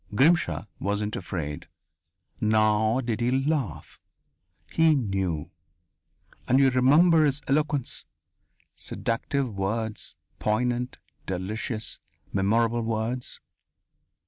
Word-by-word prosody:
Grimshaw 120 - +3
wasn't 105 +2 -1
afraid. 80 -6 -4 0.7
Nor 110 +3 +3
did 120 -1 -2
he 120 - +2
laugh. 135 - -1 0.7
He 160 -1 +4
knew. 95 - -1 1.0
And 130 - +4
you 135 -1 +5
remember 155 +6 +5
his 145 -1 +1
eloquence 145 -1 0 0.7
seductive 125 +1 -2
words, 105 +3 -2 0.2
poignant, 125 +3 0 0.3
delicious, 110 +4 -3 0.3
memorable 115 +4 +2
words! 115 +2 -2
115 Hz, 85 wpm, -26 LUFS, 105-135 Hz, 1.0 s, you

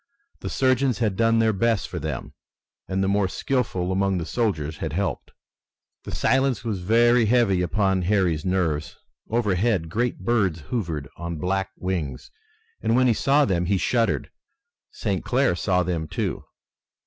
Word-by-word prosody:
The - - -5
surgeons 130 -1 +2
had 110 -5 0
done 115 +2 +3
their 110 -1 +3
best 115 0 +1
for - - -5
them - - -5 0.5
and 95 +1 -1
the - - +1
more 100 0 +2
skillful 115 -6 -1
among 95 0 +1
the 85 - -3
soldiers 80 -11 -1
had - - -4
helped. - - -2 0.8
The - - -6
silence 130 -1 +1
was 110 -5 -2
very 115 +4 +4
heavy 105 -6 +3
upon 95 +1 +1
Harry's 90 -5 +1
nerves. 80 -5 -1 0.3
Overhead 105 -5 +1
great 120 +3 -1
birds 95 -6 +1
hovered 85 - -3
on 85 0 -5
black 95 +3 -1
wings, 85 -8 -4 0.5
and 115 - +1
when 130 +1 +4
he 120 - +4
saw 140 +6 +3
them 90 -3 0
he 95 +2 +1
shuddered. 115 +4 0 0.6
St. 100 -5 -3
Clair 125 -6 +2
saw 90 0 +1
them, 85 -3 -2
too. - - -3
100 Hz, 155 wpm, -24 LUFS, 90-115 Hz, 0.8 s, very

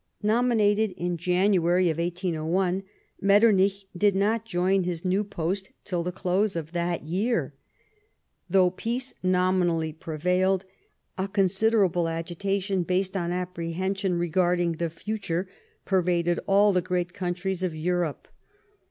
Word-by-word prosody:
Nominated 215 -2 +2
in 175 0 -2
January, 180 0 +2
1801, 175 +2 -1 0.4
Metternich 200 -1 +4
did 200 +2 +3
not 215 +3 +1
join 190 -1 +1
his 175 0 -4
new 190 +3 +2
post 190 0 -3
till 180 -3 -2
the 180 +1 -3
close 185 +2 0
of 165 -1 -4
that 175 0 -2
year. 200 +10 -1 1.0
Though 185 -2 +4
peace 240 +7 -3
nominally 180 -3 +1
prevailed, 180 +4 0 0.5
a 190 - 0
considerable 195 -2 +2
agitation, 185 +4 -2
based 185 +2 -1
on 175 -2 -1
apprehension 180 +1 -2
regarding 175 0 +1
the 165 +1 -2
future, 185 0 -3 0.4
pervaded 175 -2 +1
all 200 +1 +5
the 180 - +2
great 175 -1 -2
countries 180 0 -3
of 180 -4 -2
Europe. 170 -1 -2
180 Hz, 115 wpm, -26 LUFS, 175-195 Hz, 1.0 s, all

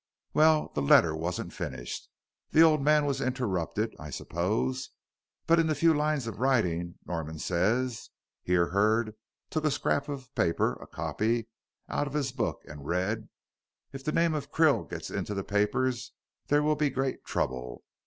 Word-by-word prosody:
"Well, 155 0 +4
the 75 - -1
letter 80 +3 +5
wasn't 85 +3 -3
finished. - - -5 0.4
The 160 - +6
old 155 -3 +5
man 150 +1 +4
was 135 -1 -1
interrupted, 110 -5 -1
I 75 - -7
suppose. 110 - -2 0.6
But 165 0 +5
in 165 - +3
the 155 - +1
few 165 +3 +4
lines 150 -3 0
of 110 -3 -6
writing 90 -10 +1
Norman 80 -2 -4
says," 110 +10 0 0.3
here 90 -1 +2
Hurd 110 +3 +2 0.4
took 155 - -1
a 155 - +3
scrap 140 0 0
of 135 -2 -7
paper 85 -1 +1
a - - -10
copy 115 +1 -1 0.4
out 145 - -1
of 140 - -7
his 140 -3 0
book 125 -2 -2
and 70 -1 -10
read, 95 +6 -1 0.6
"'If 135 0 -7
the 155 - -1
name 165 0 +2
of 145 -1 -4
Krill 160 -3 +3
gets - - -6
into 105 - -3
the 100 - -2
papers 120 +5 0 0.3
there 145 +1 +3
will 155 0 +3
be 150 -1 +1
great 135 0 -2
trouble. 60 -1 -3
125 Hz, 165 wpm, -29 LUFS, 90-145 Hz, 0.6 s, The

